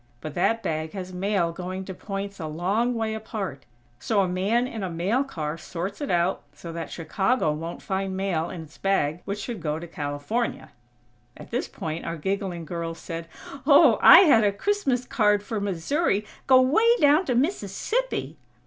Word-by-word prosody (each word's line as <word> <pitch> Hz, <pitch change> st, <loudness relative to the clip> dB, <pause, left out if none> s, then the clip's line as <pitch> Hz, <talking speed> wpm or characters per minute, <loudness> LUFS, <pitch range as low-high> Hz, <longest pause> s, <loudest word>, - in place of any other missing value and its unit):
But 155 Hz, +3 st, -7 dB
that 225 Hz, +6 st, +1 dB
bag 155 Hz, 0 st, -2 dB
has 185 Hz, -2 st, -6 dB
mail 185 Hz, -2 st, 0 dB
going 185 Hz, +2 st, -5 dB
to 190 Hz, -, -6 dB
points 195 Hz, +1 st, -6 dB
a 160 Hz, -, -4 dB
long 195 Hz, +10 st, 0 dB
way 220 Hz, -1 st, -1 dB
apart, 205 Hz, -, -5 dB, 0.3 s
so 210 Hz, -3 st, +1 dB
a 190 Hz, -, +1 dB
man 200 Hz, +7 st, +1 dB
in 230 Hz, -4 st, -5 dB
a 190 Hz, -, -2 dB
mail 190 Hz, +10 st, 0 dB
car 160 Hz, -, -5 dB
sorts 185 Hz, -, -5 dB
it 285 Hz, -, -3 dB
out, 175 Hz, +2 st, +1 dB
so 170 Hz, -1 st, -8 dB
that 165 Hz, -2 st, -5 dB
Chicago 190 Hz, +3 st, 0 dB
won't 165 Hz, +3 st, -6 dB
find 190 Hz, 0 st, -2 dB
mail 175 Hz, -4 st, -1 dB
in 175 Hz, -3 st, -7 dB
its 160 Hz, +1 st, -17 dB
bag 175 Hz, -4 st, +1 dB
which 200 Hz, +1 st, -3 dB
should 210 Hz, -1 st, -5 dB
go 150 Hz, -1 st, -1 dB
to 170 Hz, -, -7 dB
California." 150 Hz, +10 st, -3 dB, 0.7 s
At -, -, -12 dB
this -, -, -1 dB
point 160 Hz, +1 st, -5 dB
our 165 Hz, 0 st, -4 dB
giggling 190 Hz, 0 st, -3 dB
girl 165 Hz, 0 st, -4 dB
said: 165 Hz, 0 st, -7 dB, 0.4 s
"Ooooo! 285 Hz, -2 st, +7 dB
I -, -, +10 dB
had 280 Hz, -, +6 dB
a 205 Hz, -, +3 dB
Christmas 265 Hz, -, 0 dB
card 210 Hz, -4 st, +2 dB
for 210 Hz, 0 st, -3 dB
Missouri 205 Hz, -, 0 dB, 0.2 s
go 260 Hz, -1 st, +7 dB
way 440 Hz, -, +4 dB
down 295 Hz, +5 st, +5 dB
to 250 Hz, -, 0 dB
Mississippi!" 330 Hz, -, -1 dB
195 Hz, 180 wpm, -25 LUFS, 170-225 Hz, 0.7 s, I